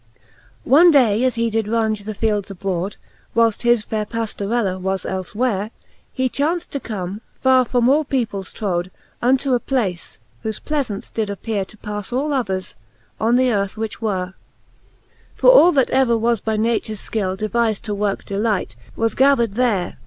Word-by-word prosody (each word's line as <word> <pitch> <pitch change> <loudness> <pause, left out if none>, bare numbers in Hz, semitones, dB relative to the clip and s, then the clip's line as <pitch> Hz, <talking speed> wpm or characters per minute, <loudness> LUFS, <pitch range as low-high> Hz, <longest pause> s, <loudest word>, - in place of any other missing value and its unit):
V. - - -35 0.5
One 335 +6 +8
day 245 -7 +4
as 255 -1 +1
he 230 0 0
did 220 -1 0
raunge 220 -2 0
the 215 0 -5
fields 210 -2 -1
abroad, 190 0 -3 0.4
Whileft 230 -2 +3
his 240 -2 +3
faire 215 -1 -3
Pajiorella 215 -3 -2
was 190 0 -2
elfe 190 +1 -4
where, 215 -4 0
^ 220 - -12 0.4
He 260 -1 0
chaunft 320 +7 -1
to 280 - -4
come, 200 -3 -5 0.2
far 260 -1 +5
from 245 0 +1
all 290 +4 +4
peoples 225 -9 -2
troad. 180 -4 -2 0.3
Unto 260 +2 +2
a 245 - +3
place, 215 -10 -2 0.3
whofe 220 -1 -3
pleafaunce 270 -10 -3
did 220 -2 -1
appere 200 0 -3
To 215 - -16
pafle 210 +4 -4
all 290 +2 -1
others, 190 -8 -2 0.5
on 230 +2 +2
the 255 0 +3
earth 200 0 -1
which 220 0 -5
were: 190 -4 -2 1.0
For - - +6
all 360 -8 +7
that 270 -4 +2
ever 255 -3 +3
was 230 -2 +1
by 220 -1 -1
natures 220 -2 -1
fkill 190 -4 -2
Devizd 220 0 0
to 215 -3 -3
worke 205 -1 -2
delight, 205 - -1 0.2
was 225 0 0
gathered 265 -5 +3
tliere. 215 -5 0
220 Hz, 175 wpm, -20 LUFS, 200-250 Hz, 1.0 s, One